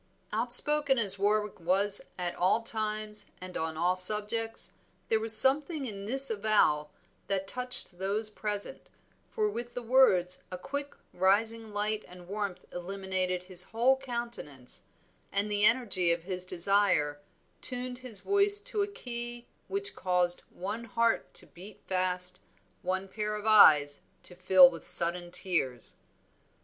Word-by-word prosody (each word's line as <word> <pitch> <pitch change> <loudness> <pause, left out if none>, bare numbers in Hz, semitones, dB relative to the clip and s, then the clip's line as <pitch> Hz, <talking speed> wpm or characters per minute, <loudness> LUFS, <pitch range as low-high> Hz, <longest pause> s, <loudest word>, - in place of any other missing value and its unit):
Outspoken 295 -2 +1
as 200 -4 +2
Warwick 210 0 -1
was 195 +4 +2 0.2
at 180 -1 -4
all 190 +6 0
times 215 -1 -4
and 185 0 -10
on 160 0 -4
all 175 +3 0
subjects, 210 +4 +2 0.4
there 220 - +1
was 220 0 +9
something 285 +3 +3
in 200 -4 -8
this 270 +3 +3
avowal 200 -9 +1 0.4
that 195 -1 -3
touched 250 -6 +4
those 210 +3 -3
present, 210 -1 -6 0.4
for 430 -2 -2
with 240 - -7
the 245 - -4
words 195 -8 +2
a 180 - -7
quick 285 +9 -6 0.2
rising 220 +4 0
light 210 +1 -3
and 180 -1 -15
warmth 200 -2 -6
illuminated 185 0 -4
his 180 -1 +5
whole 240 +4 +1
countenance, 235 - -5 0.5
and 200 +1 0
the 205 0 +3
energy 205 -8 +2
of 170 0 -2
his 185 0 -5
desire 180 -5 0 0.4
tuned 250 0 -4
his 245 -6 -7
voice 400 +1 +6
to 430 -1 -4
a 400 - -1
key 240 - -7 0.2
which 400 +1 -2
caused 180 -1 0
one 210 +6 -7
heart 230 +1 -1
to - - +1
beat 190 +4 -13
fast, 185 -1 -2 0.4
one 190 +1 -3
pair 210 +2 -5
of 210 0 -8
eyes 150 -10 +5 0.2
to - - -8
fill 185 0 +6
with 170 -2 -7
sudden 175 +1 0
tears. 150 - -2
205 Hz, 140 wpm, -28 LUFS, 180-235 Hz, 0.5 s, was